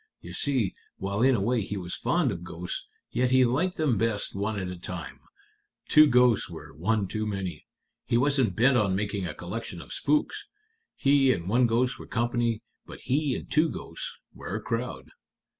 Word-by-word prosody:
You - - -10
see, 130 -8 +1 0.2
while 100 +2 -2
in 130 +1 +5
a - - 0
way 115 +3 +1
he 100 +1 -4
was 90 -2 -5
fond 170 -8 +1
of 85 -3 -5
ghosts, 90 0 -6 0.2
yet 125 +2 +1
he 130 0 +5
liked 165 +10 0
them 140 -10 +2
best 110 -2 0
one 100 +2 -2
at 95 - -3
a 90 - -5
time. 90 -2 -7 0.7
Two 155 0 +8
ghosts 125 -3 +4
were - - -10
one 100 +7 0
too 110 +3 -2
many. 95 -6 -4 0.4
He 115 - +3
wasn't 130 -6 +2
bent 125 +4 +4
on 100 -4 +2
making 100 -2 -2
a 75 - -6
collection - - -6
of - - -7
spooks. 150 +1 0 0.5
He 135 -1 +4
and 90 -7 -2
one 120 +4 +4
ghost 125 +3 +1
were - - -9
company, 120 -1 0 0.2
but - - -10
he 140 0 +1
and - - -7
two 155 +2 +4
ghosts - - -6 0.2
were - - -6
a - - -1
crowd." - - -4
115 Hz, 190 wpm, -27 LUFS, 100-130 Hz, 0.7 s, Two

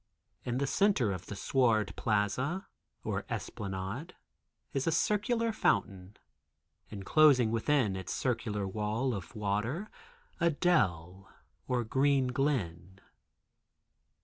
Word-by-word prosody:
In 120 0 -2
the 140 - 0
center 145 - +2
of 90 -2 -6
the 105 - -6
sward 110 -1 +1
plaza, 125 - 0 0.4
or - - -2
esplanade, 100 - -5 0.6
is 135 0 -1
a - - +3
circular 220 +7 +1
fountain, 100 - -1 0.7
enclosing 125 +4 +4
within 115 -3 +1
its 95 -2 -5
circular 105 -5 -1
wall 110 +6 -1
of 100 +2 -7
water 105 - -2 0.5
a 170 -1 +3
dell 95 - 0 0.4
or 125 -1 0
green 135 +2 +2
glen. 95 - -2
115 Hz, 105 wpm, -31 LUFS, 100-145 Hz, 0.7 s, enclosing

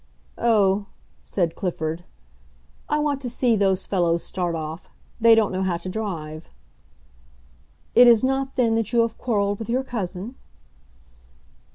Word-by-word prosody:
"Oh," 205 -3 +2 0.3
said 170 -4 -1
Clifford, 165 -2 -4 0.8
"I 300 - +2
want 295 -2 -1
to 250 - -3
see 240 -1 +1
those 195 -2 +1
fellows 170 -3 +1
start 175 -2 -2
off. 160 +1 -6 0.3
They 230 0 +7
don't 220 -2 +2
know 190 0 -2
how 185 -3 0
to 175 +2 -7
drive." 165 -7 -5 1.4
"It 245 - +8
is 235 -1 +6
not, 270 +1 -1
then, 235 -3 +2
that 225 -2 -1
you 235 - +5
have 230 -1 -2
quarreled 205 -4 0
with 225 - -6
your 255 +3 0
cousin?" 215 -1 -5
205 Hz, 145 wpm, -23 LUFS, 180-235 Hz, 1.4 s, It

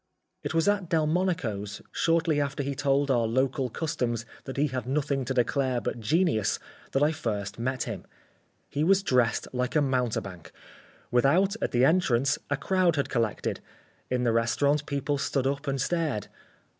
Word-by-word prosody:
It - - -4
was 165 +2 +2
at 200 -4 +1
Delmonico's, 155 - 0
shortly 165 -2 +2
after 140 0 -2
he 140 +1 -2
told 140 0 +1
our 120 -3 +2
local 130 +2 0
Customs 120 -6 -2 0.2
that 135 - -6
he 145 - +3
had 130 -1 -4
nothing 140 -1 0
to 130 - -1
declare 130 0 +1
but 120 - -3
genius, 135 - +1 0.4
that 135 - +3
I 150 - +4
first 105 -9 -3
met 130 +1 -1
him. - - -6 0.6
He 145 - -1
was 195 +3 +4
dressed 125 - +2
like 125 +2 -1
a - - +5
mountebank. 120 - -2 0.6
Without, 165 - +3
at - - +1
the 125 +1 +3
entrance, 140 -6 +2
a 145 - +1
crowd 185 +1 +2
had 140 - -1
collected. 115 -4 -1 0.5
In 125 -1 0
the 120 - +3
restaurant 140 +6 +1
people 140 0 -1
stood 135 -2 0
up 140 +2 -1
and 135 -1 -1
stared. 150 - -1
135 Hz, 165 wpm, -27 LUFS, 120-155 Hz, 0.6 s, a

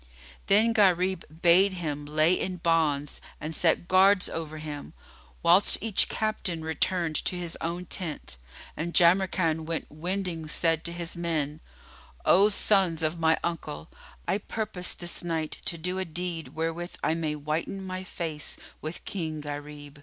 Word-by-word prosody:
Then 220 +4 +5
Gharib 190 -3 +3 0.2
bade 185 +3 +6
lay - - -6
him 150 -4 -4 0.4
in 185 -1 -3
bonds 160 -4 +1 0.2
and 155 +1 -4
set 170 +1 +2
guards 190 +1 +5
over 155 -1 -5
him, 150 -2 -7 0.5
whilst 175 +4 +5
each 220 -3 +1
captain 205 -6 -2
returned 165 0 0
to - - -1
his 175 -2 -3
own 170 +2 -3
tent, 160 - -5 0.4
and 170 +2 -4
Jamrkan 175 -2 +4
while 165 0 -2
wending 170 0 -3
said 165 +1 +1
to 170 - -3
his 170 0 -3
men, 160 -3 -2 0.7
"O 200 +4 +6
sons 190 -6 +2
of 155 +2 0
my 160 0 +4
uncle, 150 - -4 0.4
I 200 - +1
purpose 210 -4 0
this 175 0 -2
night 160 -2 -2
to 170 - 0
do 180 +3 -2
a 190 - -1
deed 170 0 -4
wherewith 165 +2 -3
I - - +2
may 160 -2 -1
whiten 155 +6 -3
my 185 0 -4
face 165 -5 -5 0.2
with 155 +2 -6
King 160 -5 -3
Gharib." 145 0 -7
170 Hz, 150 wpm, -28 LUFS, 155-185 Hz, 0.7 s, bade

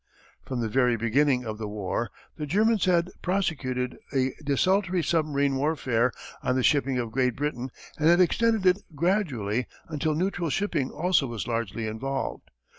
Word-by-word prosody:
From 130 -3 -2
the 115 - 0
very 125 +1 +2
beginning 125 +3 +2
of 110 -1 -5
the 110 - -3
war 105 +2 -2 0.3
the 150 -2 -5
Germans 215 +5 +3
had 175 -1 +2
prosecuted 140 -9 -1
a 130 -1 +1
desultory 185 +5 +2
submarine 145 -4 +1
warfare 130 -5 +1 0.3
on 125 - 0
the 130 - +1
shipping 135 -2 +3
of 120 -2 -2
Great 125 -1 +1
Britain 135 -3 -2 0.3
and 155 +1 +4
had 175 +1 +6
extended 220 +3 +3
it 185 +2 +4
gradually 140 - 0 0.2
until 155 0 -1
neutral 175 0 -1
shipping 155 -6 0
also 165 -3 +1
was 115 -4 -4
largely 115 -1 -2
involved. 130 +5 -4
140 Hz, 155 wpm, -27 LUFS, 125-175 Hz, 0.3 s, had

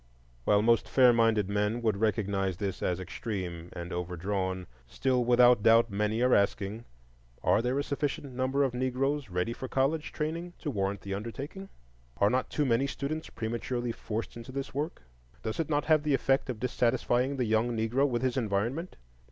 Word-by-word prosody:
While 105 0 +4
most 115 0 +3
fair 125 -2 +6
minded 115 -3 +3
men 105 +3 0
would 110 -3 +2
recognize 100 -3 0
this 95 -2 -3
as 90 0 0
extreme 90 -3 -5
and 85 +1 -6
overdrawn, 95 +1 -2 0.2
still 130 - +1
without 120 -1 +5
doubt 115 +1 +5
many 105 +3 0
are 125 - +4
asking, 100 +3 +1 0.6
Are - - +4
there 125 +3 0
a 140 - +1
sufficient 140 -1 -3
number 130 +2 +1
of 135 -3 0
Negroes 130 +1 -1
ready 90 +5 -1
for 130 - -6
college 140 +5 0
training 165 +3 -3
to 150 - -4
warrant 100 -3 -1
the 100 - -5
undertaking? 140 - -6 0.5
Are 100 +1 +3
not 130 0 0
too 150 - 0
many 130 +2 +2
students 150 +4 -4
prematurely 120 +2 -3
forced 115 0 -5
into 120 +2 -9
this 135 +1 -5
work? 145 - -3 0.4
Does 110 +5 -3
it 160 - -1
not 145 -1 +1
have 155 -2 +4
the 150 -2 +2
effect 135 0 +1
of 120 -4 -3
dissatisfying 125 +2 +1
the 125 - +1
young 110 +2 +1
Negro 120 +6 +2
with 120 -1 -1
his 130 0 0
environment? 120 - -1
120 Hz, 175 wpm, -29 LUFS, 105-135 Hz, 0.6 s, fair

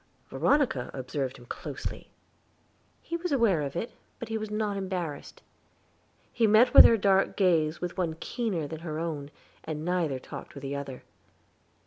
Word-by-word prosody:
Veronica 270 - +1
observed 130 0 -3
him 120 - -14
closely; - - -6 0.9
he 335 - -4
was 355 +1 -4
aware 230 - +3
of 140 -2 -4
it, 220 +7 -3 0.3
but 230 -2 -7
was 215 -1 -3
not 210 -1 -1
embarrassed; 185 -6 -5 0.9
he 230 -2 +3
met 220 +4 +6
her 230 - +9
dark 195 -1 +2
gaze 170 -5 +2
with 180 +1 -4
one 165 -3 0
keener 200 - -2
than 160 +1 -7
her 160 -2 -5
own, 155 -4 -4 0.3
and 155 0 -5
neither 175 -6 0
talked 130 - -10
with 140 - -9
the 140 +1 -3
other. 135 -2 -6
175 Hz, 150 wpm, -28 LUFS, 145-215 Hz, 0.9 s, her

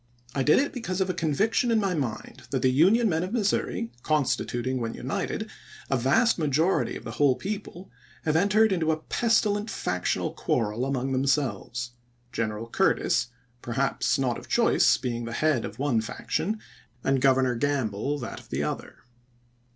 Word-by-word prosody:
I 135 - 0
did 150 +3 +5
it 285 - +1
because 200 -7 -3
of 190 -1 +1
a - - -5
conviction 200 - +1
in 225 -1 +3
my 195 -3 0
mind 135 -9 -4
that - - -1
the 130 - +4
Union 195 - +4
men 165 -4 +1
of 185 - -4
Missouri, 205 - 0
constituting, 130 -3 0
when 115 -1 -3
united, - - -3 0.4
a - - +4
vast 140 - +3
majority 155 +4 +1
of - - -8
the - - -6
whole 140 -3 +3
people, 195 +3 -6 0.3
have 155 -1 0
entered 205 +5 +4
into 165 -4 +1
a 155 - 0
pestilent 210 +3 +1
factional 90 - -1
quarrel 115 +4 -1
among 135 -1 -1
themselves; 130 -3 -1 0.4
Greneral 110 0 -3
Curtis, - - +2 0.3
perhaps 135 +3 0
not 125 -3 0
of - - -14
choice, - - +4
being 120 -2 -3
the 115 - -5
head 150 -1 +1
of 105 - -8
one 130 -4 +1
faction, 125 - -2 0.4
and 135 -1 +1
Governor 130 -1 +4
Gamble 135 0 -1
that 120 -5 -6
of - - -18
the - - -1
other. - - -5
140 Hz, 165 wpm, -26 LUFS, 125-185 Hz, 0.4 s, did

